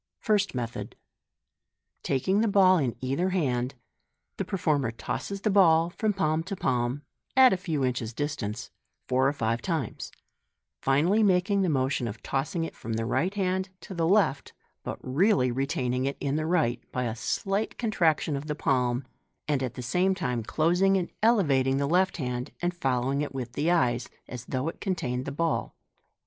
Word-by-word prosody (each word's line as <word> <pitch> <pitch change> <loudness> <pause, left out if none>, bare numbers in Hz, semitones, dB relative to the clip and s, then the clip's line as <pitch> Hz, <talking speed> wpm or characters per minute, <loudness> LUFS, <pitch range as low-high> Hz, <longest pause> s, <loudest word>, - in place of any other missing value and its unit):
First 205 -7 +1
Method. 120 -1 -4 0.5
— - - -55
Taking 185 +10 +2
the 225 - +2
ball 190 -3 +5
in 130 -6 -1
either 135 +8 0
hand, 130 -8 0 0.6
the - - -1
performer 155 - 0
tosses 195 +11 -5
the 215 - +1
ball 170 -4 +5
from 215 +4 0
palm 160 -5 0
to 195 - -4
palm 125 -2 -1 0.3
(at 260 -3 +8
a - - +3
few 160 -7 -1
inches 125 -3 -2
distance) 120 -5 -4 0.4
four 130 +1 +3
or - - +3
five 115 -4 -1
times, 160 - -3 0.7
finally 160 +11 +3
making 200 0 +3
the 185 - +1
motion 130 -3 0
of 110 0 -7
tossing 155 +6 -1
it 165 - -5
from 115 - -5
the 115 0 -1
right 180 - 0
hand 190 -1 0
to - - -8
the 165 -2 0
left, 190 -7 +2 0.3
but - - -5
really 140 - +2
retaining 130 -1 -1
it 140 - -2
in 140 0 -1
the 155 0 -1
right 150 -9 +1
by 125 - -1
a 115 -2 -2
slight 195 - -2
contraction 165 -9 +1
of 140 +2 -5
the 150 - -2
palm, 125 -3 0 0.4
and 145 -3 +1
at 125 -3 -3
the 125 - -6
same 180 +10 +1
time 125 -10 -2
closing 175 - +2
and 180 - -3
elevating 140 - +3
the 140 - +1
left 180 +5 +2
hand, 125 -4 -3
and 175 0 -1
following 135 -3 0
it 145 -2 -4
with 125 -2 -4
the 150 +6 0
eyes, 125 -9 +1 0.2
as 120 -1 -7
though 130 +4 -2
it 165 - -5
contained 135 - -2
the - - -4
ball. 165 +3 -1
150 Hz, 180 wpm, -27 LUFS, 125-185 Hz, 0.7 s, at